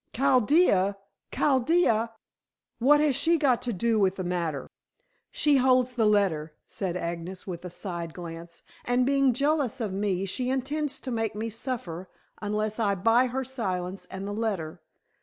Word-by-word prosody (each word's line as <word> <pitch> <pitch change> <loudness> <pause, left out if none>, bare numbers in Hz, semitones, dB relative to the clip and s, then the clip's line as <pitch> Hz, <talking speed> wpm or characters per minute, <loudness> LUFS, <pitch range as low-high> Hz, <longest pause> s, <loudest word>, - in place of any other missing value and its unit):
"Chaldea! 250 - +3 0.3
Chaldea! 260 -4 +2 0.7
What 290 +5 +5
has 295 -3 +2
she 335 +5 +3
got 270 -6 +2
to 245 - -2
do 225 +2 +1
with 190 -2 +2
the 185 - -4
matter?" 170 -5 -2 0.6
"She 295 -2 +3
holds 255 -1 +3
the 225 -3 +2
letter," 165 -7 +1
said 180 -3 -3
Agnes 170 +2 -5
with 175 -3 -6
a - - -5
side 170 -2 -5
glance. 170 -1 -9 0.2
"And 245 +1 +2
being 275 -1 +3
jealous 280 0 0
of 215 -5 -2
me, 195 -1 -1
she 250 +6 -2
intends 275 +2 -1
to 260 - -5
make 225 -2 -1
me 225 +2 -3
suffer, 195 -7 -5 0.3
unless 215 +1 -2
I 205 -3 +2
buy 230 +7 +3
her 265 +2 -2
silence 195 -8 -4
and 190 +1 -6
the 205 - -4
letter. 190 -7 -3
220 Hz, 160 wpm, -27 LUFS, 185-260 Hz, 0.7 s, What